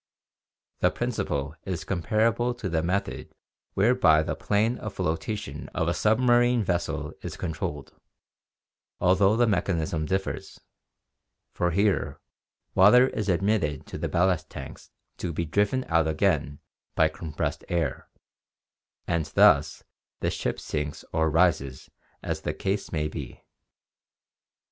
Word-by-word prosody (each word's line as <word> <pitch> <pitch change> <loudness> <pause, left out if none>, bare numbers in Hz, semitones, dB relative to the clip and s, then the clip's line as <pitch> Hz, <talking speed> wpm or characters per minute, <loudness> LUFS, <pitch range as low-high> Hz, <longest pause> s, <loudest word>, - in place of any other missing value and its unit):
The - - +4
prin - - -2
ciple 70 +1 -2
is 95 -3 -4
comparable 115 +6 +1
to 110 - -5
the 80 -3 0
method 90 +4 -3 0.4
whereby 100 -8 +4
the - - -2
plane 110 +4 0
of 110 -2 -6
flotation 80 -3 -3
of 80 - 0
a 85 - +2
submarine 120 +2 +3
vessel 80 -5 -2
is - - -6
controlled, 80 -4 -4 1.1
although 95 +3 +4
the 120 - +4
mechanism 85 -6 0
differs, 95 +2 -3 0.9
for 90 - 0
here 90 -6 +1 0.5
water 125 +7 +6
is 105 -2 -3
admitted 90 -5 0
to - - -7
the - - -2
ballast 90 -2 +1
tanks 65 -2 -9 0.3
to 90 - -3
be 85 +1 -2
driven 105 +10 +1
out 80 -1 +2
again 75 -2 0 0.4
by 80 - +5
compressed 80 -1 -4
air, 85 -6 -2 1.0
and 85 -3 0
thus - - +4 0.4
the - - 0
ship - - -2
sinks 75 -1 -4
or 80 0 +2
rises 80 -6 +1 0.3
as - - -3
the - - -3
case 100 +1 -2
may 75 -2 -1
be. 75 - -8
90 Hz, 125 wpm, -26 LUFS, 80-105 Hz, 1.1 s, water